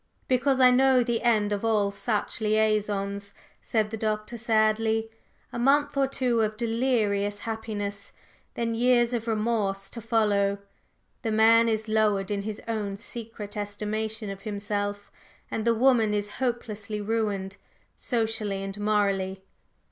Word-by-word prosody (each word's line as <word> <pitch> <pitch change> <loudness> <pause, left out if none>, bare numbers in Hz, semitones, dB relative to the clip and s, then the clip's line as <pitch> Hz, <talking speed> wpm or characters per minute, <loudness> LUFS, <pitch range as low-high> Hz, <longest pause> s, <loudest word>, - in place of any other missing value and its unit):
"Because 260 +1 +2
I 255 -1 +7
know 260 0 +5
the 235 -1 -1
end 215 -3 +2
of 205 - -3
all 210 -3 +2
such 210 +2 -2
liaisons," 210 -2 0 0.3
said 215 -2 0
the 220 - -3
Doctor 215 +1 -2
sadly. 220 -1 +1 0.4
"A - - -3
month 285 +3 +3
or 275 -1 +2
two 250 -4 +1
of 215 0 -1
delirious 225 -4 0
happiness, 210 -3 -4 0.4
then 230 -1 -1
years 240 +1 +3
of 235 -1 -2
remorse 210 -3 -1
to 230 - -7
follow. 205 -3 +2 0.6
The 230 - -2
man 225 +1 +5
is 220 0 -1
lowered 210 -3 +1
in 200 -1 -1
his 210 +1 -5
own 210 -3 -2
secret 225 -2 -8
estimation 210 +1 -3
of 195 0 -8
himself, 205 0 -3 0.4
and 220 - -2
the 230 0 +3
woman 230 -3 +3
is 205 0 -2
hopelessly 215 -4 -2
ruined, 205 -2 -2 0.4
socially 220 -4 -2
and 195 +1 -6
morally. 195 -2 0
215 Hz, 140 wpm, -27 LUFS, 205-230 Hz, 0.6 s, I